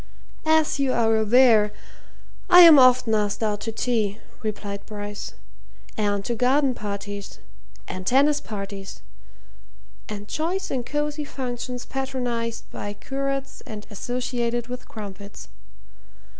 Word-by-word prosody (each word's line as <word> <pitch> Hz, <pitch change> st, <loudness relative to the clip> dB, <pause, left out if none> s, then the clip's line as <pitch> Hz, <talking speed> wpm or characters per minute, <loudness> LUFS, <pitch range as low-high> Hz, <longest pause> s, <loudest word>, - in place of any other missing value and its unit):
"As 315 Hz, -2 st, +3 dB
you 270 Hz, -2 st, +2 dB
are 225 Hz, -1 st, +3 dB
aware, 220 Hz, -1 st, +5 dB, 0.8 s
I 360 Hz, -, +10 dB
am 325 Hz, -5 st, +10 dB
often 250 Hz, -3 st, +5 dB
asked 210 Hz, 0 st, 0 dB
out 210 Hz, -1 st, 0 dB
to 225 Hz, -, -3 dB
tea," 220 Hz, -3 st, 0 dB, 0.2 s
replied 205 Hz, -2 st, -4 dB
Bryce, 205 Hz, -1 st, -6 dB, 0.6 s
"and 205 Hz, -2 st, 0 dB
to 240 Hz, -, -1 dB
garden 260 Hz, +3 st, +2 dB
parties, 205 Hz, -2 st, -6 dB, 0.5 s
and 185 Hz, -, -5 dB
tennis 280 Hz, +8 st, +3 dB
parties, 200 Hz, -2 st, -7 dB, 1.1 s
and 205 Hz, -1 st, -6 dB
choice 345 Hz, -, -2 dB
and 255 Hz, -2 st, -1 dB
cosy 295 Hz, +3 st, -2 dB
functions 250 Hz, -3 st, -5 dB
patronized 245 Hz, -4 st, -3 dB
by 205 Hz, -, -5 dB
curates 275 Hz, +2 st, -4 dB
and 215 Hz, -1 st, -7 dB
associated 240 Hz, +2 st, -2 dB
with 250 Hz, 0 st, -7 dB
crumpets. 200 Hz, -2 st, -9 dB
235 Hz, 115 wpm, -24 LUFS, 205-265 Hz, 1.1 s, I